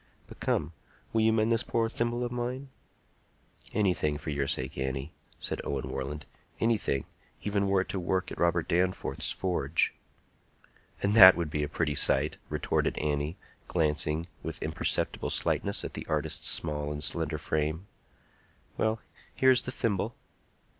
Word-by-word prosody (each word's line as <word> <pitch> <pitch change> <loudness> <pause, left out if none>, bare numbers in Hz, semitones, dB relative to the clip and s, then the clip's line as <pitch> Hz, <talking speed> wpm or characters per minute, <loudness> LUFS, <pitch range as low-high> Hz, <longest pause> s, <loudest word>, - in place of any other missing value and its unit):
But - - -14
come, 80 +3 0 0.4
will 110 - +3
you 110 0 +4
mend 110 0 +2
this 115 0 +3
poor 115 -1 0
thimble 120 +1 -1
of 120 - -3
mine?" 125 +3 -3 1.0
"Anything 90 -8 +1
for 75 +1 -5
your 70 -1 -1
sake, 65 -1 -2
Annie," 65 +2 -3 0.2
said - - -3
Owen 70 -2 -3
Warland,—"anything, 75 - -2 0.4
even 100 -1 +1
were 95 -1 +3
it - - -6
to 95 - -2
work 90 +1 -1
at - - -7
Robert 85 -1 +2
Danforth's 90 +2 0
forge." 85 -5 0 1.1
"And 100 +1 +2
that 95 -4 +11
would 85 -3 -2
be 75 - -1
a 75 - -2
pretty 75 -1 0
sight!" 70 +1 +2
retorted - - 0
Annie, 75 +2 -1 0.3
glancing 75 -1 0 0.2
with - - -4
imperceptible - - -1
slightness - - +1
at - - -5
the - - -6
artist's - - 0
small 75 -2 +1
and 75 0 -3
slender 80 -2 +1
frame. 80 +4 -1 0.9
"Well; 110 0 0 0.3
here 130 0 +5
is 130 - +4
the 125 - -5
thimble." 110 -2 -1
85 Hz, 150 wpm, -29 LUFS, 75-110 Hz, 1.1 s, that